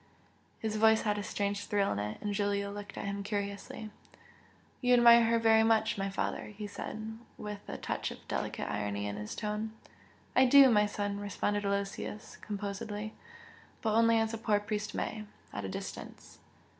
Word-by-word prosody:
His 215 -1 -2
voice 220 0 +5
had 210 -1 +1
a - - -3
strange 200 0 -2
thrill 200 -1 +2
in 100 - -1
it, 105 +1 -3
and 205 -1 -1
Giulio 200 0 0
looked 205 0 -8
at - - -4
him 200 0 -3
curiously. 200 +1 -4 0.9
"You 250 -1 +5
admire 235 -1 +8
her 230 +1 +3
very 225 -1 +5
much, 220 -1 +3
my 195 0 -2
father!" 195 - -2
he 210 - -4
said, 220 +2 -6 0.2
with 210 -1 -5
a - - -5
touch - - -3
of - - -11
delicate - - -3
irony 100 0 -2
in 100 0 -3
his 105 0 -5
tone. 210 +1 -3 0.6
"I 260 - +7
do, 270 0 +8
my 210 -2 +4
son!" 205 -1 -3
responded 205 0 -1
Aloysius, 200 +1 -3
composedly, 210 +1 -5 0.7
"But 220 -2 +1
only 230 +1 +5
as 225 0 +1
a 225 - -3
poor 215 -2 +2
priest 210 0 -3
may 215 -1 -3 0.3
at 100 - -4
a - - -3
distance!" - - -8
210 Hz, 175 wpm, -32 LUFS, 200-220 Hz, 0.9 s, admire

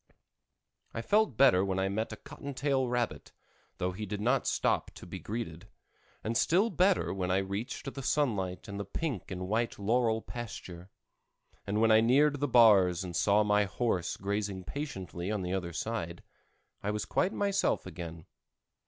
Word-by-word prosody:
I 115 - -3
felt 210 - +2
better 125 -9 +6
when 95 -1 -1
I 95 0 +1
met 110 +3 -2
a - - -5
cotton 140 -1 -9
tail 135 -1 +1
rabbit, 120 -1 -2 0.4
though 90 +1 -1
he 105 +3 -6
did 105 +1 -4
not 125 +5 +1
stop - - +1
to - - -10
be - - -7
greeted; 105 -4 -6 0.5
and 115 +2 -2
still 190 - +3
better 185 +1 +2
when 95 -2 -2
I 95 - +3
reached 100 +8 -4
the 135 - -6
sunlight 110 -10 0
and 100 0 -6
the - - -2
pink 115 - -4
and 95 -1 -4
white 115 +3 0
laurel 110 +2 +1
pasture; 95 -6 -8 0.8
and 105 +2 0
when 115 0 +5
I 110 0 +7
neared 140 +5 +4
the 145 - +1
bars 100 -8 +6
and 90 -2 -6
saw 105 +3 +4
my 105 0 +3
horse 95 -4 -1
grazing 100 -1 -2
patiently 95 - -5
on 105 -3 -1
the 90 +1 -2
other 90 -3 -2
side, 85 -2 -4 0.6
I 105 - -2
was 105 0 -2
quite 190 - +1
myself 200 -1 0
again. 85 -2 -8
105 Hz, 170 wpm, -31 LUFS, 95-125 Hz, 0.8 s, I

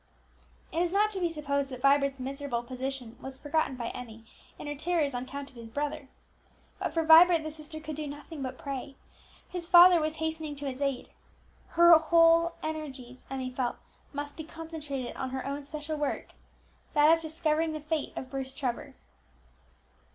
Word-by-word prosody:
It 330 - 0
is 350 -1 +1
not 420 +2 +3
to 390 - -3
be 350 -2 +1
supposed 280 -3 -1
that 255 -2 -8
Vibert's 275 -1 +3
miserable 270 -2 -3
position 255 -1 -5
was 265 0 -7
forgotten 290 -1 0
by 235 -2 -4
Emmie 225 -2 -9 0.3
in - - -8
her 290 - -3
terrors 305 -1 0
on 245 +1 -3
account 280 +1 -7
of - - -24
his 230 -1 -9
brother. 285 +2 -3 0.7
But - - -2
for 330 - 0
Vibert 330 +1 +8
the 310 - -4
sister 310 0 -9
could 310 -1 -6
do 305 -1 -3
nothing 290 +1 -8
but 260 -1 -4
pray; 275 -2 -6 0.5
his 350 -2 -6
father 350 -1 +9
was 310 0 -1
hastening 320 -1 -3
to 285 0 -7
his 270 0 -4
aid: 275 -3 -1 0.7
her 340 0 +9
whole 330 +1 +5
energies, 270 -5 -6
Emmie 260 -1 -3
felt, 250 -1 -1 0.4
must 290 0 -5
be 315 - -5
concentrated 310 -5 -6
on 260 - -3
her 260 0 -4
own 280 +1 -3
special 305 +1 -5
work, 295 -1 -2 0.7
that 300 +2 +7
of 330 - -7
discovering 315 0 0
the 310 - -4
fate 305 0 -2
of 260 - -6
Bruce 265 -1 -4
Trevor. 255 -5 -3
290 Hz, 180 wpm, -29 LUFS, 265-320 Hz, 0.7 s, father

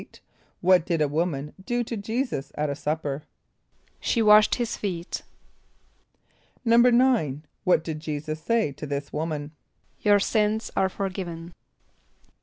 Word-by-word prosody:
= - - -35
What 180 -1 +5
did 170 -1 -1
a 150 - +3
woman 150 -1 -2
do 240 +3 0
to 235 - -5
J[=e]´[s+]us 225 - -3
at 150 -1 -1
a - - -3
supper? 150 -1 -2 0.8
=She 230 - +1
washed 210 0 +7
his 240 -2 -2
feet.= 180 -3 -4 1.4
=9.= 235 - +4 0.2
What 180 -3 +4
did 160 -2 -4
J[=e]´[s+]us 155 0 -4
say 230 -8 +1
to 145 +2 -8
this 140 0 -4
woman? 150 -1 -3 0.5
="Your 205 -1 +4
sins 215 +1 0
are 190 - +2
forgiven." 180 -3 -5
175 Hz, 130 wpm, -26 LUFS, 150-220 Hz, 1.4 s, washed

